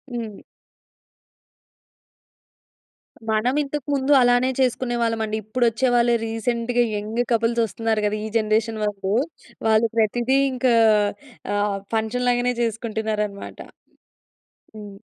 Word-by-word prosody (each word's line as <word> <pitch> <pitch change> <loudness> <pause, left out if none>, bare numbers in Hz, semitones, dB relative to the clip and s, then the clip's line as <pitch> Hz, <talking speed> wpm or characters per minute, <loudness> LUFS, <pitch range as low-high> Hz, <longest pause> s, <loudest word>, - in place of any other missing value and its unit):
హ్మ్. 220 -4 -5 2.9
మనం 220 +4 +1
ఇంతకు 290 -1 -5
ముందు 275 0 0
అలానే 245 +1 +3
చేసుకునేవాళ్ళమండి. 235 -4 0
ఇప్పుడొచ్చే 235 +3 +1
వాళ్ళే 240 0 +3
రీసెంట్‌గా 235 +2 0
యంగ్ 215 +3 -2
కపుల్స్ 230 +1 +2
వస్తున్నారు 220 +1 -1
గద, 210 - 0
ఈ - - -3
జనరేషన్ 220 0 0
వాళ్ళు. 200 -1 -2 0.5
వాళ్ళు 220 +1 +4
ప్రతీదీ 240 +4 +2 0.2
ఇంకా 250 -1 +2 0.8
ఆహ్, 205 -1 0 0.2
ఫంక్షన్‌ 225 +3 -1
లాగానే 245 0 +1
చేసుకుంటున్నారనమాట. 220 -3 -3 1.2
హ్మ్. 205 -2 -10
230 Hz, 95 wpm, -22 LUFS, 215-245 Hz, 2.9 s, వాళ్ళు